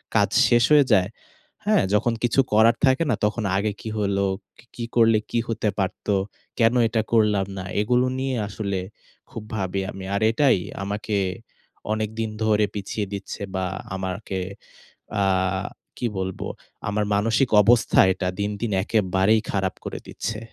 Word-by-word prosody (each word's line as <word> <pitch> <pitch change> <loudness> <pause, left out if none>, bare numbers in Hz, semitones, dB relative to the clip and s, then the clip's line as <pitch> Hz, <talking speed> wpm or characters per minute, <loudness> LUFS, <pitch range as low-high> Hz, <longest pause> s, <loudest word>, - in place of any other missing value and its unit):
কাজ - - +4 0.2
শেষ 120 -1 +4
হয়ে 145 -2 +7
যায়, 95 -1 +3 0.6
হ্যাঁ? 210 -4 +3
যখন 115 +3 +2
কিছু 120 +3 +2
করার 110 +2 +5
থাকে 130 +5 +3
না - - +2
তখন 105 +1 -1
আগে 105 +1 0
কি 110 - -5
হলো, 100 -1 +1 0.3
কি - - -19
কি 120 - -5
করলে 115 -2 +5
কি 120 - +1
হতে 110 -2 -1
পারত, 95 +1 -3 0.5
কেন 115 +1 +4
এটা 110 0 0
করলাম 105 -4 +3
না, 95 - -4 0.2
এগুলো 125 +3 +2
নিয়ে 135 -1 -1
আসলে 100 -2 -3 0.5
খুব 110 - -7
ভাবি 95 -1 -2
আমি। 95 -1 -8
আর 100 - -1
এটাই 135 -2 +3 0.3
আমাকে 105 +1 -3 0.8
অনেকদিন 110 +1 -2
ধরে 105 -1 +3
পিছিয়ে 100 +1 -3
দিচ্ছে 100 0 -6
বা 95 0 -1 0.3
আমাকে 95 +1 -4 0.8
আ - - +3 0.7
কি 120 - -1
বলবো, 95 0 -4 0.4
আমার 105 0 0
মানসিক 115 +5 +2
অবস্থা 115 +2 +4
এটা 90 - -3
দিন 100 +1 0
দিন 115 -3 -1
একেবারেই 105 0 +2
খারাপ 95 -2 -1
করে - - -5
দিচ্ছে। 110 -1 -4
105 Hz, 150 wpm, -24 LUFS, 100-115 Hz, 0.8 s, হয়ে